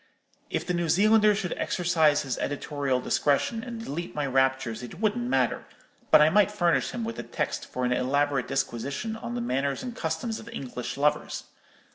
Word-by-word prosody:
If - - -2
the 180 - -1
New 170 -1 -1
Zealander 210 +4 +5
should 195 -4 -2
exercise 160 -5 +2
his 135 -3 -3
editorial 145 -2 -1
discretion, 145 - +1
and 235 -2 -6
delete 170 +5 -5
my 150 -1 -1
raptures, 130 -3 +1
it 125 +8 -9
wouldn't 230 +3 0
matter; - - +1 0.4
but 150 - +8
I 155 - +4
might 205 +2 +5
furnish 175 -9 +1
him 240 - -4
with 230 0 -4
the - - -3
text - - -3
for 125 0 -3
an 125 - +2
elaborate 140 +1 +1
disquisition 135 - -2
on 235 +2 -6
the 240 - -2
manners 140 - -1
and 245 -2 -5
customs 165 +5 -3
of 230 - -10
English 125 - -5
lovers. 150 +1 0
155 Hz, 180 wpm, -27 LUFS, 135-215 Hz, 0.4 s, but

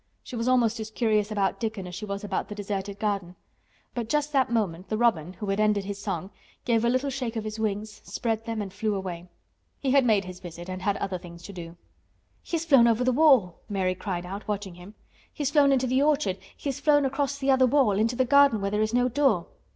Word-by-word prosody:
She 255 - -8
was 230 +1 -2
almost 240 -3 +3
as 220 0 -5
curious 215 -2 +1
about 200 -2 0
Dickon 220 -4 -3
as 180 - -8
she 205 +4 -5
was 200 0 -5
about 205 - -2
the 210 - -7
deserted 200 -1 -4
garden. 200 -4 -2 0.6
But 235 -2 -4
just 300 +1 0
that 265 -3 +3
moment 190 -6 -1
the 215 - -1
robin, 185 -8 +1
who 210 - -6
had 195 +1 0
ended 210 -2 +2
his 200 0 -5
song, 195 -2 -4 0.3
gave 230 -2 +2
a 235 - +3
little 255 +3 0
shake 250 -3 -3
of 220 - -2
his 215 0 -5
wings, 210 0 -3
spread 225 -2 -2
them 225 -2 -2
and 195 -2 -8
flew 210 +1 -1
away. 180 -2 -5 0.5
He 270 - 0
had 275 0 +5
made 215 -5 +3
his 180 -1 -8
visit 175 0 -9
and 185 0 -5
had 200 0 0
other 190 -2 -3
things 170 -1 -12
to 200 - -9
do. 170 -1 -9 0.6
"He 335 - -2
has 325 - -4
flown 270 -7 +6
over 230 +1 +2
the 255 - +3
wall!" 255 - +4
Mary 190 -2 0
cried 180 -2 -4
out, 195 +3 -7
watching 205 -3 -3
him. 180 +5 -13 0.4
"He 300 - -5
has 280 - 0
flown 290 -2 +5
into 260 -1 +2
the 255 +2 +2
orchard—he 290 -6 -1
has 275 - -2
flown 290 -2 +4
across 280 +1 -1
the 275 -1 +1
other 260 -1 +5
wall—into 230 -4 +2
the 260 +1 +2
garden 280 -3 +5
where 200 0 -2
there 210 +1 +1
is 215 +2 0
no 245 0 +3
door!" 255 -8 +2
215 Hz, 235 wpm, -26 LUFS, 195-255 Hz, 0.6 s, flown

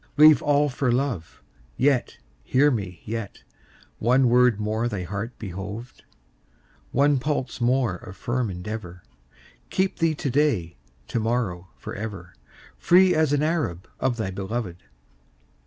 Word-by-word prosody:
Leave 150 -2 +8
all 145 0 +3
for 130 -2 0
love; 120 - -2 0.3
Yet, 135 -1 +1 0.3
hear 145 - +3
me, 95 - -4
yet, 110 -2 -5 0.6
One 125 +2 +4
word 125 -3 +4
more 110 +2 -1
thy 100 -6 -3
heart 105 +6 -5
behoved, 100 +5 -7 0.9
One 140 +1 +3
pulse 130 -2 -2
more 120 -5 +2
of 95 +2 -11
firm 120 -1 -1
endeavor, 90 -1 -6 0.7
Keep 190 0 0
thee 165 -2 +2
to 145 -2 -2
day, 120 - +1 0.3
To - - -1
morrow, 110 -6 -1
forever, 100 -5 -7 0.5
Free 185 +1 +5
as 155 -2 +2
an 145 0 +2
Arab 150 - -1
Of 120 -2 0
thy 105 -4 -2
beloved. 95 -1 -4
120 Hz, 130 wpm, -25 LUFS, 100-140 Hz, 0.9 s, Leave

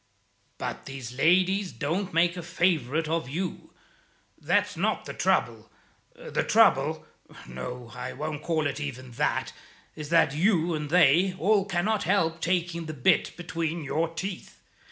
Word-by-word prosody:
But - - -5
these 135 -3 -7
ladies 185 +7 +2
don't 180 +7 -2
make 170 +2 +2
a 175 - -5
favourite 165 -4 0
of 160 -4 -1
you; 175 +5 -4 0.6
that's - - 0
not - - -1
the - - -6
trouble. - - 0 0.5
The - - -3
trouble - - +3 0.4
no, 115 - -7
I 125 0 -5
won't 155 +1 -5
call 160 -1 0
it 140 0 -2
even 130 -3 -6
that 115 - -1 0.4
is 150 -1 -7
that 165 -4 +4
you 170 0 +2
and 150 -2 -3
they 180 +3 +4
all 200 +3 +3
cannot 200 +3 0
help 165 -3 +1
taking 170 -1 -1
the 155 - -5
bit 125 - +2
between 165 -1 -3
your 155 +4 0
teeth. 185 +3 -6
165 Hz, 145 wpm, -27 LUFS, 145-180 Hz, 0.6 s, that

